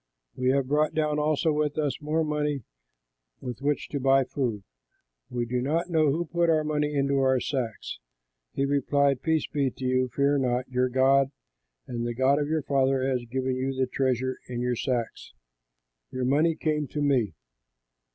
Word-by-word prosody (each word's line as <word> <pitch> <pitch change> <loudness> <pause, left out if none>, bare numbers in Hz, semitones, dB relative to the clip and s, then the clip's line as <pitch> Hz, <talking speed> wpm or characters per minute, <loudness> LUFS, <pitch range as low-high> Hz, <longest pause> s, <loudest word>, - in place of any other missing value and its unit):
We 130 0 0
have 135 0 +2
brought 150 +2 +1
down 150 -1 +1 0.4
with 150 0 -1
us 150 -2 -1
more 155 +2 0
money 150 -3 -1 0.8
with 125 0 -6
which 145 +1 0
to 140 - -3
buy 135 0 +4
food. 120 -7 -3 0.7
We 120 -1 -2
do 125 +1 -1
not 165 +7 -1
know 155 -2 +3
who 170 +4 -1
put 170 +1 +1
our 155 -1 +3
money 150 -1 -1
into 140 0 +2
our 130 -1 +3
sacks." 120 - -4 0.5
He 135 - 0
replied, 140 -1 +2
"Peace 160 -2 +1
be 140 -3 0
to 130 +1 -8
you, 130 0 +2
fear 140 +2 +1
not; 125 -1 0
your 125 0 0
God 135 +1 +4 0.6
and 120 -1 -4
the 120 0 -3
God 135 +3 +3
of 145 - -1
your 155 -1 0
father 135 -1 +1
has 130 -2 -1
given 130 +2 -2
you 130 +1 -2
the 130 0 +1
treasure 130 0 -1
in 120 -1 -4
your 125 0 0
sacks; 120 -1 -3 0.8
your 130 0 -3
money 155 +5 +3
came 150 -2 -1
to 150 - -5
me." 125 - +1
135 Hz, 175 wpm, -27 LUFS, 130-150 Hz, 0.8 s, buy